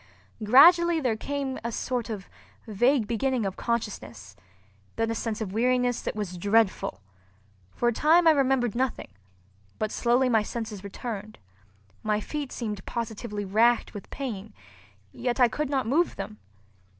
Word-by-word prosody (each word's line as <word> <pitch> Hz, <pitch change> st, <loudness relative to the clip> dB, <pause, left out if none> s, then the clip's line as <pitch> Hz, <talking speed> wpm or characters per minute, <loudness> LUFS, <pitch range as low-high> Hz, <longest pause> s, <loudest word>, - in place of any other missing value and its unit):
Gradually 335 Hz, +9 st, +7 dB
there 250 Hz, -7 st, 0 dB
came 275 Hz, +2 st, -3 dB
a 235 Hz, -, -2 dB
sort 245 Hz, -1 st, -3 dB
of 205 Hz, -4 st, -6 dB, 0.4 s
vague 240 Hz, +3 st, +2 dB
beginning 235 Hz, +1 st, 0 dB
of 195 Hz, -1 st, -3 dB
consciousness, 120 Hz, -, -4 dB, 0.6 s
then 225 Hz, 0 st, 0 dB
a -, -, 0 dB
sense 225 Hz, -1 st, -3 dB
of 195 Hz, -3 st, -4 dB
weariness 245 Hz, +1 st, +1 dB
that -, -, -4 dB
was 185 Hz, -4 st, -4 dB
dreadful. 200 Hz, -, +1 dB, 0.7 s
For 240 Hz, -, 0 dB
a -, -, -1 dB
time 325 Hz, +8 st, +4 dB
I -, -, +9 dB
remembered 265 Hz, -6 st, +2 dB
nothing, 255 Hz, -, -2 dB, 0.7 s
but 215 Hz, 0 st, -2 dB
slowly 245 Hz, +2 st, +2 dB
my 225 Hz, -3 st, +3 dB
senses 215 Hz, -2 st, -5 dB
returned. 210 Hz, +1 st, -6 dB, 0.6 s
My 210 Hz, -1 st, 0 dB
feet 285 Hz, +4 st, -5 dB
seemed 210 Hz, -5 st, -4 dB
positively 220 Hz, -2 st, -4 dB
racked 230 Hz, +5 st, +2 dB
with 205 Hz, -, -9 dB
pain, 220 Hz, -7 st, -6 dB, 0.6 s
yet 245 Hz, +1 st, -2 dB
I 250 Hz, -, +7 dB
could 290 Hz, +5 st, -3 dB
not 270 Hz, -2 st, 0 dB
move 305 Hz, +10 st, +1 dB
them. 210 Hz, +2 st, -7 dB
235 Hz, 150 wpm, -27 LUFS, 210-260 Hz, 0.7 s, I